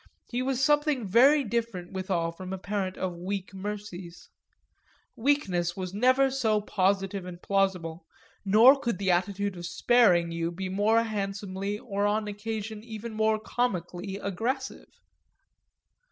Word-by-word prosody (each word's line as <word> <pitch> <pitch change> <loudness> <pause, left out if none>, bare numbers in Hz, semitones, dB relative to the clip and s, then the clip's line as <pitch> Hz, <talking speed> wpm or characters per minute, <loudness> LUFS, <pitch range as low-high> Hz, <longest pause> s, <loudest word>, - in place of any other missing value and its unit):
He 245 +1 -1
was 265 0 0
something 295 -6 +2
very 270 +9 +5
different 225 -6 -3
withal 185 -3 -1
from 185 +2 -8
a 190 - -3
parent 195 -1 -3
of 185 -2 -3
weak 190 +1 -4
mercies; 195 -3 -7 0.8
weakness 195 - 0
was 185 -1 -4
never 255 +5 +3
so 225 -5 +1
positive 195 -1 0
and 180 -1 -8
plausible, 180 -4 -1 0.4
nor 225 +8 +7
could 235 -7 -2
the 195 -2 +1
attitude 195 +2 0
of 175 -1 -6
sparing 180 -5 +3
you 165 0 -2
be 185 +2 -5
more 215 +4 +3
handsomely 200 -2 -3
or 205 -2 -1
on 210 +1 0
occasion 215 +1 -5
even 225 0 -7
more 220 0 +2
comically 190 -5 -2
aggressive. 235 +8 -3
200 Hz, 135 wpm, -28 LUFS, 185-230 Hz, 0.8 s, nor